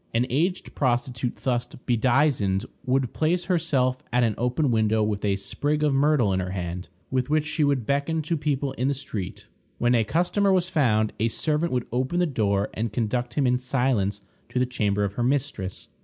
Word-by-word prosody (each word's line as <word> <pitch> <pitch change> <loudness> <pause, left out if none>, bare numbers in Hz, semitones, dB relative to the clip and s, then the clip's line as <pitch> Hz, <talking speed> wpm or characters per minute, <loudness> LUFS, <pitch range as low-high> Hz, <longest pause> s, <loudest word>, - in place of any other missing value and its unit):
An 120 +2 +3
aged 175 +8 0
prostitute 125 -1 -1
thus 125 -2 -1
bedizened 120 -4 +1 0.2
would 130 -1 +1
place 175 +3 +1
herself 140 -8 +1
at 125 +1 +3
an 115 -2 +2
open 125 +3 0
window 110 -1 +2
with 105 -1 -2
a 100 -2 +2
sprig 145 +10 -1
of 150 -2 +3
myrtle 135 -7 +3
in 95 - +1
her 90 0 -3
hand, 90 -2 -4 0.2
with 130 0 0
which 155 0 +2
she 150 +1 0
would 140 -5 +1
beckon 145 +5 0
to 165 +3 -1
people 145 -2 -1
in 130 0 -1
the 140 - +1
street. 105 -9 -6 0.3
When 120 +1 +2
a 115 -2 +4
customer 180 - +1
was 185 -1 +2
found, 110 -11 +2
a 110 - +2
servant 155 +7 0
would 125 -2 0
open 130 +7 -1
the 180 - +3
door 105 - 0
and 110 0 -2
conduct 120 +2 -2
him 145 - +2
in 125 0 +2
silence 125 -6 0 0.3
to - - -5
the 125 - +3
chamber 105 -5 0
of 100 -1 -1
her 120 - -2
mistress. 125 -8 -2
125 Hz, 195 wpm, -25 LUFS, 110-145 Hz, 0.3 s, a